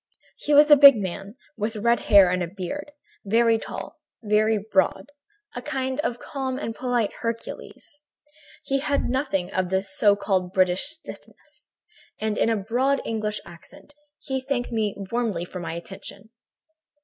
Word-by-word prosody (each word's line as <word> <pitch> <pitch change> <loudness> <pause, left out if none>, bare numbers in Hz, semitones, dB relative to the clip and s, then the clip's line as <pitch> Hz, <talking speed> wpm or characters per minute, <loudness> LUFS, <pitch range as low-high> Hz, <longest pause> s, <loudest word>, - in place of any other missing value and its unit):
"He - - -4
was 295 +1 +7
a - - +11
big 280 -1 +9
man, 195 +1 -5 0.2
with 220 +1 -3
red 235 +3 +2
hair 200 -4 +6
and 180 0 -2
beard, 290 +11 -5 0.3
very 225 +2 +3
tall, - - -8 0.2
very 215 +1 +2
broad, 200 +3 0 0.4
a 245 - -4
kind 260 +1 -3
of 245 -6 -1
calm 265 -1 -4
and 230 -5 -4
polite 245 -3 -1
Hercules. 230 +5 -6 0.6
He 275 0 0
had 280 -3 -1
nothing 245 -9 -1
of 185 -1 -1
the 190 +1 0
so 200 +1 +3
called 190 -3 -1
British 185 -1 +2
stiffness, 300 -2 -12 0.5
and 215 -1 -1
in - - +1
a 225 - +1
broad 250 +7 0
English 215 -2 -2
accent 230 - -15 0.2
he 265 -1 -4
thanked 260 -2 -3
me 215 -3 -1 0.2
warmly 225 -8 -1
for 180 - -8
my 165 -1 -5
attention. 195 +4 -9
220 Hz, 150 wpm, -24 LUFS, 195-260 Hz, 0.6 s, a